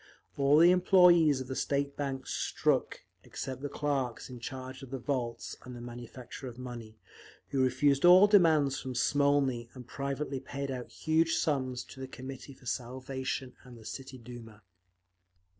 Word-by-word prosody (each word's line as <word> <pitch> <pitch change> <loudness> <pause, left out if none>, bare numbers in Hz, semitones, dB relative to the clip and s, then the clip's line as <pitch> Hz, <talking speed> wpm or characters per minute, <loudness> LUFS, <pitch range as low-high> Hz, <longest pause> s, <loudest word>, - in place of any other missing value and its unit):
All 140 +1 +4
the 170 +3 +7
employees 175 -6 +5
of 130 - -7
the 130 - -4
State 140 +1 -1
Bank 135 -2 -3
struck - - 0 0.2
except 130 -1 -6
the 145 - -3
clerks 135 -4 -2
in 125 - -8
charge 130 +2 -7
of 135 - -10
the 135 - -4
vaults 125 -3 -3
and 125 -1 -9
the - - -8
manufacture 120 +2 -9
of 120 -1 -9
money, 120 -3 -8 0.5
who 135 - 0
refused 140 +2 +2
all 180 +3 +9
demands 160 -9 +4
from 130 -1 -6
Smolny 135 -3 +2
and 125 -1 -9
privately 140 0 -3
paid 140 +1 -5
out 125 -2 -5
huge 165 +1 +1
sums 130 -4 -1
to - - -13
the 130 - -5
Committee 135 +1 -9
for 130 - -20
Salvation 130 +1 -4
and 125 -2 -13
the 110 - -14
City 135 +2 -7
Duma. 115 -3 -11
130 Hz, 160 wpm, -31 LUFS, 125-145 Hz, 0.5 s, all